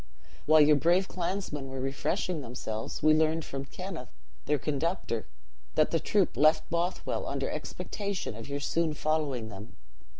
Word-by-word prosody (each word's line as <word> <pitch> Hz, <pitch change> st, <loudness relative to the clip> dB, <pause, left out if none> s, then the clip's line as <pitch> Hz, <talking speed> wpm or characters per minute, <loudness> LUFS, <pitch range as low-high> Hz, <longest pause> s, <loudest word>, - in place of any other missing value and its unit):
"While 155 Hz, 0 st, +7 dB
your 150 Hz, 0 st, +7 dB
brave 175 Hz, +6 st, +3 dB
clansmen 175 Hz, -6 st, -3 dB
were 135 Hz, 0 st, -5 dB
refreshing 150 Hz, +6 st, -1 dB
themselves, 115 Hz, -3 st, -5 dB
we 155 Hz, 0 st, +7 dB
learned 160 Hz, +1 st, +2 dB
from 135 Hz, 0 st, -5 dB
Kenneth, 175 Hz, -3 st, -7 dB, 0.4 s
their 150 Hz, -, +3 dB
conductor, 145 Hz, -, -1 dB, 0.5 s
that -, -, +4 dB
the -, -, +2 dB
troop -, -, +2 dB
left 155 Hz, +1 st, +4 dB
Bothwell 170 Hz, +2 st, -1 dB
under -, -, -2 dB
expectation 200 Hz, -, -4 dB
of 115 Hz, +4 st, -8 dB
your 140 Hz, 0 st, -3 dB
soon 160 Hz, +1 st, 0 dB
following 145 Hz, -8 st, 0 dB
them. 100 Hz, +1 st, -10 dB
155 Hz, 145 wpm, -30 LUFS, 135-170 Hz, 0.5 s, While